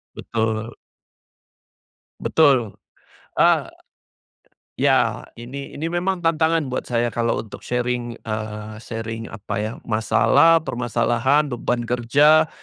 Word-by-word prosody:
Betul. 110 0 -2 1.4
Betul. 130 -9 +3 0.7
Ah, - - +4 1.1
ya - - +2 0.2
ini 135 +4 -8
ini 155 - -3
memang 180 +1 -1
tantangan 165 -1 +2
buat - - -2
saya 120 -1 +1
kalau 115 0 0
untuk 105 - -11
sharing, 120 -1 -2
eee, 110 -1 -5
sharing 115 0 -6
apa 105 - -7
ya, 110 +1 -2
masalah 120 +8 +4
permasalahan 120 +3 +1
beban 120 -1 -2
kerja 145 +7 +4
120 Hz, 100 wpm, -22 LUFS, 115-145 Hz, 1.4 s, Ah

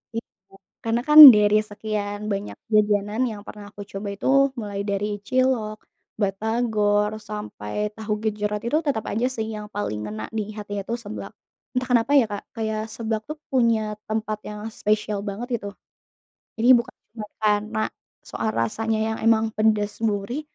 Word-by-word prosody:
Iya. 230 - -2 0.6
Karena 230 +1 +1
kan 300 +1 +7 0.2
dari 210 0 +4
sekian 205 -1 -4
banyak 200 +1 -4 0.2
jajanan 210 +1 +2
yang 205 -2 -8
pernah 210 -1 -9
aku 205 - -9
coba 195 +1 -5
itu - - -6 0.3
mulai 205 -2 -5
dari 200 +1 -1 0.2
cilok, 250 -4 +1 0.4
batagor, 210 0 +1 0.2
sampai 210 - -6 0.2
tahu 220 -1 -4
gejrot 210 -1 -2
itu 240 - +1
tetap 225 -7 0
aja 230 +4 +1
sih 220 -1 -2
yang 210 0 -7
paling 205 - -2
ngena 110 +1 -6 0.2
di - - +1
hatinya 205 -1 -5
itu 235 - -2
seblak. 205 +1 -7 0.4
Entah 255 0 -1
kenapa 240 +2 +3
ya 260 - +5
Kak, 205 - -4
kayak 220 -1 -2
seblak 220 -1 -2
tuh 305 - -5
punya 235 -4 +3 0.3
tempat 215 -1 -2
yang 210 0 -7 0.2
spesial 210 0 0
banget 205 +5 -5
gitu. 205 - -7 0.9
Jadi 230 +2 0
bukan 235 - -6 0.5
karena 210 +1 +1 0.5
soal 115 -1 -2
rasanya 220 - -1
yang 220 0 -2
emang 225 -1 +4
pedes 215 -1 +2
gurih, 215 +6 -1
215 Hz, 150 wpm, -23 LUFS, 205-225 Hz, 0.9 s, kan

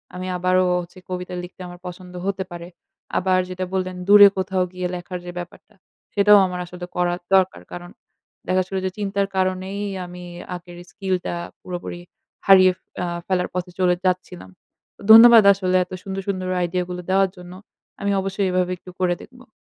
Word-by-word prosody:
আমি 185 +1 -5
আবারো 185 +1 +2 0.2
হচ্ছে 175 +1 -13
কবিতা 180 0 -5
লিখতে 180 +1 -11
আমার 175 0 -11
পছন্দ 180 0 -10
হতে 195 -1 -1
পারে। 170 0 -8 0.5
আবার 185 0 +2
যেটা 185 0 -4
বললেন 185 -1 -2
দূরে 205 0 +10
কোথাও 190 0 0
গিয়ে 180 0 -3
লেখার 180 +1 -6
যে 175 - -6
ব্যাপারটা 175 0 -11 0.4
সেটাও 205 0 +6
আমার 180 -1 -5
আসলে 180 0 -8
করা 175 0 +1 0.2
দরকার। 185 - +2
কারণ 175 0 -8 0.6
দেখা 185 - +1
যাচ্ছিলো 190 +1 -2
যে 185 - -1
চিন্তার 200 -1 -1
কারণেই 185 +1 -1 0.3
আমি 180 0 -10 0.3
আগের 175 0 -11
স্কিল 190 -1 -2
টা - - -2 0.3
পুরোপুরি 175 -1 -6 0.5
হারিয়ে 185 -1 +8 0.3
আ - - -1 0.2
ফেলার 185 -1 0
পথে 180 0 -4
চলে 180 -1 +3
যাচ্ছিলাম। 180 - -2 0.5
তো - - -18
ধন্যবাদ 230 0 +10
আসলে 185 -2 -1
এত - - -39
সুন্দর 195 0 -4
সুন্দর 185 -2 -2
আইডিয়া 180 +1 -1
গুলো 180 0 -5
দেওয়ার 195 0 +3
জন্য। 180 0 -11 0.5
আমি 200 0 0
অবশ্যই 195 +1 -1
এভাবে 180 0 0
একটু 180 - -14
করে 180 -1 +1
দেখব। 250 0 -16
185 Hz, 170 wpm, -22 LUFS, 180-190 Hz, 0.6 s, দূরে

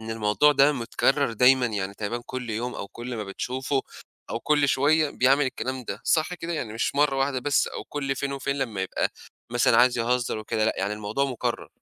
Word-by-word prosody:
إن 110 0 -7
الموضوع 110 +7 +3
ده 140 +1 +5
متكرر 135 +1 +1
دايمًا 125 +2 +5
يعني 100 -3 -3
تقريبًا 115 +4 -4
كل 125 -2 -5
يوم 120 +3 -3
أو 100 - -6
كل 120 +3 -7
ما 105 - -4
بتشوفه 130 +7 -2 0.5
أو 115 - -3
كل 145 -2 +2
شوية 150 +3 +3
بيعمل 135 +3 +3
الكلام 130 -1 -4
ده. 100 - -5
صح 160 +2 +1
كده؟ 170 0 -5
يعني 120 -9 -4
مش 115 - -1
مرّة 145 -1 +2
واحدة 135 0 0
بس 145 +2 +2
أو - - -7
كل 140 -2 -3
فين 140 +1 -2
وفين 140 0 -2
لمّا 110 -8 -2
يبقى 95 - -1 0.4
مثلًا 120 0 +3
عايز 125 0 +5
يهزّر 120 -1 0
وكده، 110 0 -1
لأ، - - +2
يعني 100 +2 -1
الموضوع 105 +6 -1
مكرر. 130 -4 -3
125 Hz, 205 wpm, -25 LUFS, 110-140 Hz, 0.5 s, ده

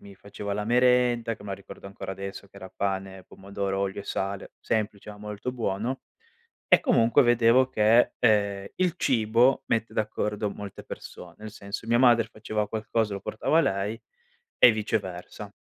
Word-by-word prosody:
mi 100 -1 -13
faceva 100 +1 -7
la 105 +1 -2
merenda, 120 -1 +3
che - - -16
me 105 - -9
la 100 - -2
ricordo 100 0 -11
ancora 95 0 -7
adesso 100 +1 -7
che - - -33
era 95 -1 -10
pane, 95 -1 -3
pomodoro, 100 0 -4
olio 100 0 -2
e - - -11
sale- 100 0 -4
semplice, 105 -2 -2
ma 105 - -11
molto 105 +3 -5
buono- 120 +1 -3 0.7
e - - +6
comunque 115 +4 +4
vedevo 120 +1 +4
che, 115 +2 +4
ehm, 100 -3 +2
il 180 -2 +1
cibo 120 0 +3
mette 115 0 -1
d'accordo 105 -1 -2
molte 100 -1 -9
person 85 -1 -10
nel 110 0 -9
senso, 100 +1 -7
mia 120 +1 +2
madre 120 -3 +5
faceva 105 -1 -3
qualcosa 110 0 -1
lo 100 - -4
portava 155 +8 +1
a - - +5
lei 105 -4 -2 0.6
e 125 - +8
viceversa. 100 -5 -4
105 Hz, 170 wpm, -26 LUFS, 100-115 Hz, 0.7 s, e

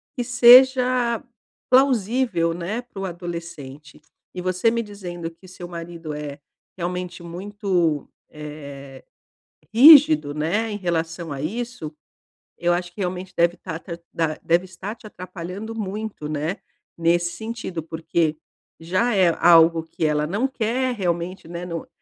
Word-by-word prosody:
que 245 - -2
seja 250 -1 +6 0.5
plausível, 235 -9 +3
né, 185 +8 -4
pro 200 -6 -7
adolescente. 170 -5 -8 0.3
E 180 - -4
você 185 +4 +1
me 235 0 -1
dizendo 175 -5 -7
que 175 +3 -18
seu 180 -1 -9
marido 170 -2 -7
é 150 -1 -6 0.4
realmente 180 0 -4
muito, 180 - -1 0.2
eh, 140 -3 -10 0.7
rígido, 290 - +8
né. 185 +9 -1
Em 205 - -3
relação 165 -2 -2
a 135 - -5
isso, 220 -3 -5 0.6
eu 175 0 +2
acho 175 0 -3
que 200 - -7
realmente 185 0 -4
deve 170 +1 +3
estar 160 - -7
ta 170 -1 -8
ta 170 - -34
da, 160 -2 -1
deve 170 +2 +2
estar 190 +4 -7
te 225 -2 -13
atrapalhando 185 +3 -7
muito, 210 -5 -5
né. 155 +5 -2 0.4
Nesse 170 +1 +1
sentido, 220 -7 -5
porque 160 -1 -1 0.4
já 185 +9 0
é 180 -3 +4
algo 165 -1 +6
que 160 0 -4
ela 150 -1 +1
não 205 +10 0
quer 255 0 -1
realmente, 175 -2 -3
né, 175 +1 -6
no 170 -2 -5
175 Hz, 140 wpm, -23 LUFS, 165-215 Hz, 0.7 s, rígido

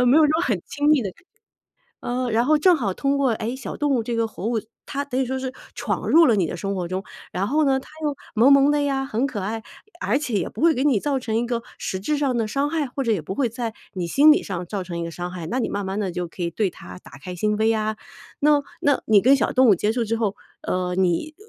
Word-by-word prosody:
呃， 250 - +3
没 255 - +5
有 320 - +7
说 - - +1
很 205 -8 0
亲 290 +1 -1
密 300 - +5
的 195 - -3
感 - - -25 0.8
呃， 250 0 -2
然 230 +2 +2
后 305 +3 +4
正 350 +3 +5
好 205 -9 -2
通 280 +4 0
过， 270 -2 +2
诶， 230 +3 -3
小 260 - -6
动 290 -1 0
物 240 - +1
这 235 +1 -3
个 230 -1 0
活 215 - -7
物， 230 -1 0 0.2
它 280 0 -3
等 265 -2 -2
于 - - +2
说 260 +1 -3
是 260 -1 -4 0.2
闯 - - -3
入 330 +1 +7
了 230 - +4
你 185 -4 +2
的 165 - -5
生 195 +3 -3
活 180 -2 -2
中。 185 +2 -3 0.3
然 195 +3 -1
后 305 +2 +2
呢， 265 -1 +2
它 - - -16 0.2
又 295 - 0 0.2
萌 240 +6 +6
萌 275 +1 +6
的 295 0 +2
呀， 270 -1 0
很 255 +1 -1
可 245 -6 -4
爱， 220 +4 -3 0.4
而 - - +1
且 270 -6 -4
也 195 - 0
不 - - -9
会 330 0 +5
给 265 - -1
你 260 -9 +3
造 280 -2 0
成 235 -4 -4
一 235 - +1
个 235 -1 -2 0.2
实 190 - -3
质 295 +10 -1
上 275 -4 0
的 225 -2 0
伤 275 +6 0
害， 315 -3 0
或 270 +2 -4
者 235 - 0
也 200 -6 +1
不 190 - -5
会 250 +1 +1
在 230 -1 -4 0.2
你 180 -2 -2
心 285 - +6
理 305 - +5
上 180 -2 -5
造 195 0 -4
成 170 -1 -5
一 - - -2
个 170 - -5
伤 175 +2 -5
害， 175 -3 -6
那 240 +10 -2
你 255 - 0
慢 205 0 -3
慢 195 +2 -3
地 195 -4 -2
就 180 -1 -3
可 180 - -8
以 170 - -1
对 195 +1 0
它 90 - -11
打 - - -17
开 180 +6 -7
心 210 +4 0
扉 220 +1 +2
啊。 215 0 -1 0.4
那 295 0 +4 0.2
那 285 -1 +2
你 210 -2 +6
跟 260 +6 +5
小 275 - +1
动 260 0 +5
物 210 - +7
接 210 +4 0
触 235 0 0
之 225 +1 -1
后， 210 -3 -1 0.3
呃， 180 -1 -1
你 190 - 0
230 Hz, 305 characters per minute, -23 LUFS, 195-275 Hz, 0.8 s, 有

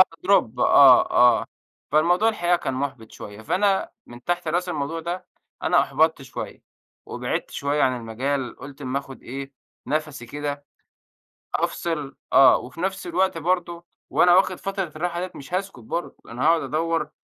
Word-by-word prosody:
آه 185 - +11 0.2
drop 125 - +3
آه، 135 -3 +7
آه. 125 0 +4 0.5
فالموضوع 175 +8 +4
الحقيقة 175 -5 +1
كان 135 -6 -3
مُحبِط 130 -5 -5
شوية. 105 +1 -10
فأنا 195 - +1 0.2
من 120 +1 -13
تحت 175 -2 -1
راس 175 +3 0
الموضوع 155 +1 -3
ده، 175 +3 -5 0.4
أنا - - +4
أُحبطت 160 -2 +1
شوية، 130 -1 -8 0.4
وبعدت - - -3
شوية 145 +1 -1
عن 130 -1 +2
المجال. 125 +3 -3
قُلت 140 0 -11
اما 130 +1 -1
آخد 135 -1 -11
إيه، 135 +2 -7 0.3
نَفَسي 150 -5 -3
كده، 145 +1 -5 0.9
أفصل، 150 -5 -2 0.2
آه، 135 - +7
وفي 150 +7 -9
نَفس 190 -1 -2
الوقت 185 0 +1
برضو 170 0 -1 0.3
وأنا 175 0 +5
واخد 190 0 +3
فترة 195 0 -3
الراحة 175 +2 -2
دية 180 0 -4
مش 140 +5 -11
هاسكت 195 -6 -3
برضو، 170 +10 -5
أنا 120 +2 -4
هاقعد 165 +1 +4
أدوّر، 165 -1 -1
155 Hz, 155 wpm, -24 LUFS, 135-175 Hz, 0.9 s, آه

